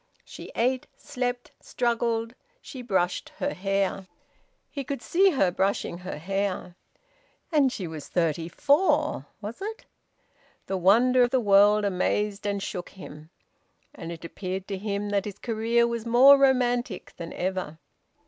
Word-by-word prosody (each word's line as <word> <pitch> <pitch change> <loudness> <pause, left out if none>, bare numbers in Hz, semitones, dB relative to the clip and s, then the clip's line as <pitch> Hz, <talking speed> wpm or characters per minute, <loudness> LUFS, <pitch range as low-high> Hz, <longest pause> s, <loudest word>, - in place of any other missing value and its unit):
She - - -10
ate, 255 +2 0
slept, 245 -1 -4
struggled; 235 -1 -1 0.3
she 260 - -9
brushed 190 -6 -1
her 285 - -2
hair. 195 0 -1 0.6
He 280 - -4
could 275 0 -4
see 375 - +4
her 230 - +2
brushing 190 -2 -1
her 185 -2 -6
hair. 190 +1 -3 0.8
And 285 -5 +3
she 195 - -5
was 160 -3 -7
thirty 165 -1 -1
four 290 - +2
was 215 - -7
it? 440 +4 -6 0.8
The 190 - -2
wonder 235 +8 +4
of 245 - +4
the 260 - +2
world 205 -1 +5
amazed 200 +2 -1
and 200 -1 -2
shook 175 -1 -5
him. 155 -5 -12 0.6
And 165 -2 -8
it 170 0 -8
appeared 185 +2 -5
to 195 - -3
him 205 0 -3
that 200 -1 0
his 205 -2 -6
career 230 +1 +1
was 235 -1 -3
more 255 +4 +8
romantic 245 -6 +1
than 170 -1 -7
ever. 185 -4 -3
205 Hz, 145 wpm, -26 LUFS, 185-245 Hz, 0.8 s, more